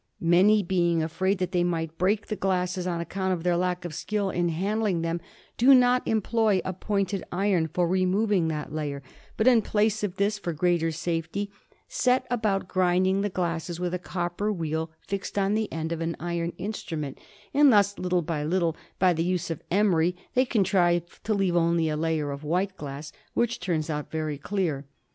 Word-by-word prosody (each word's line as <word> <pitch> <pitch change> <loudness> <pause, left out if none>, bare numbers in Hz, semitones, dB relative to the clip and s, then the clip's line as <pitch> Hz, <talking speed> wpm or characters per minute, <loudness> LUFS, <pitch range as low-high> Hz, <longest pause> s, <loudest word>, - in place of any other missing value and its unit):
Many, 190 +5 +4
being 175 -2 +1
afraid 190 +5 0
that 180 -1 -2
they 175 -2 +2
might 165 -2 -2
break 200 +4 +1
the 215 - -3
glasses, 185 -1 -1
on 170 -2 -1
account 190 +2 -2
of 170 -2 -4
their 175 -1 +2
lack 180 0 -1
of 170 - -5
skill 205 +3 -2
in 175 0 0
handling 195 +1 0
them, 165 +1 -2 0.4
do 265 +3 +7
not 250 0 +4
employ 220 -2 +2
a 185 - -2
pointed 195 0 -1
iron 180 -3 +1
for 175 +2 0
removing 185 0 +2
that 150 -2 -4
layer, 145 -3 -3 0.3
but 220 - +1
in 245 -3 +6
place 215 0 +1
of 195 -3 -2
this, 205 +2 0
for 175 -4 -3
greater 170 +1 +1
safety, 165 +5 -3 0.4
set 255 0 +1
about 210 -6 0
grinding 185 +1 +2
the 205 - 0
glasses 170 -2 -3
with 180 0 -2
a 180 - -1
copper 175 +3 -2
wheel 160 -3 -2 0.2
fixed 200 0 -4
on 195 0 +2
the 215 0 -1
end 160 0 -3
of 165 -1 -3
an 165 0 -2
iron 170 0 -2
instrument; 160 -9 -5 0.3
and 285 -1 +6
thus, 205 -2 +3
little 180 -1 0
by 155 -2 -2
little, 170 0 +1 0.2
by 185 -1 +4
the 165 0 0
use 175 -1 -1
of 165 - -4
emery, 180 -3 +2 0.2
they 255 +1 +3
contrive 180 -6 +1
to 215 - -3
leave 190 -3 +1
only 170 -1 +2
a 155 - -1
layer 155 -2 -1
of 140 +1 -6
white 185 +5 0
glass, 145 -2 -7 0.2
which 235 -1 +1
turns 170 -4 -1
out 150 -2 -3
very 155 -2 -3
clear. 155 -6 -2
180 Hz, 190 wpm, -26 LUFS, 165-200 Hz, 0.4 s, do